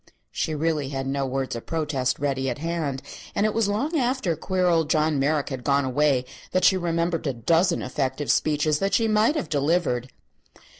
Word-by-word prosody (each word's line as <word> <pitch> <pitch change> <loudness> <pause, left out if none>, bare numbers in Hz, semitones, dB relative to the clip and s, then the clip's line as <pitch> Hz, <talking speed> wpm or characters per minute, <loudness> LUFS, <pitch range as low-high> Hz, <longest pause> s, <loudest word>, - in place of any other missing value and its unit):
She 155 - -2
really 150 -2 -1
had 135 -1 -3
no 135 0 -1
words 130 -1 -2
of 115 - -8
protest 140 -6 -1
ready 135 -2 -1
at 120 - -3
hand, 155 -4 -3 0.3
and 205 - +2
it 215 - +1
was 225 -2 +1
long 285 +11 0
after 245 -9 0
queer 185 +4 -1
old 165 -3 +2
John 155 -2 +2
Merrick 145 +1 +1
had 130 -3 -5
gone 140 0 +2
away 130 -1 +2 0.3
that 185 - +2
she 190 - +6
remembered 170 -2 -1
a 135 - 0
dozen 165 +9 +2
effective 135 +2 -1
speeches 150 0 +1
that 195 -1 +1
she 225 +2 +2
might 215 +7 +3
have 180 - -2
delivered. 145 -4 0
150 Hz, 190 wpm, -25 LUFS, 135-175 Hz, 0.3 s, she